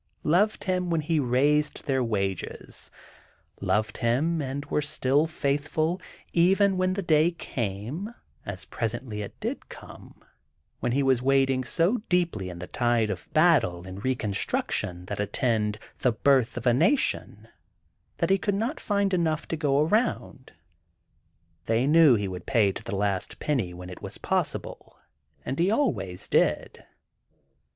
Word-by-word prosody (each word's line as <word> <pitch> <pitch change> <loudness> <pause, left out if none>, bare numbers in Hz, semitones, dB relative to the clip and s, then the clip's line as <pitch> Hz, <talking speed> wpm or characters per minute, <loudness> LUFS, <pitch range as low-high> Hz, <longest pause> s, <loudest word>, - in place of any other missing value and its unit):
Loved 195 +7 +2
him 180 -2 -1
when 165 -2 +1
he 155 +1 0
raised 145 +4 +1
their 135 -3 +1
wages, 100 -5 -3 0.7
loved 105 -1 0
him 140 +8 +1
and 140 +1 -4
were 150 - 0
still 145 0 +1
faithful 155 +4 -1 0.3
even 190 +3 +4
when 185 0 +1
the 200 - -2
day 160 0 +4
came, 130 - -4 0.3
as 100 -1 -6
presently 115 -1 -3
it 100 - -8
did - - -4
come, - - -13 0.6
when 120 - -1
he 140 +3 +1
was 130 -2 +3
wading 135 -1 +2
so 175 - +2
deeply 170 - 0
in 90 - -8
the 90 - -6
tide 120 0 +1
of 95 -3 -7
battle 140 - +3
and 95 +1 -8
Reconstruction 100 -6 -1
that - - -5
attended 105 0 0 0.2
"The 125 - +3
Birth 130 0 +2
of 120 - -5
a 120 - +5
Nation," 270 - +1 0.7
that - - 0
he 195 - +4
could 205 +1 0
not 230 +9 -2
find 200 -2 0
enough 165 -3 0
to - - -1
go 145 -3 +2
around. 205 - -1 1.2
They 115 +3 +2
knew 150 -3 +6
he 100 -2 -1
would 90 -1 -7
pay 110 -7 +3
to - - -8
the 115 -4 -4
last 100 -2 -1
penny 125 -12 -1
when 90 +1 -9
it 90 - -10
was - - -7
possible, - - -3 0.5
and 135 - -3
he 175 +3 +3
always 105 - -1
did. - - 0
135 Hz, 150 wpm, -26 LUFS, 110-165 Hz, 1.2 s, knew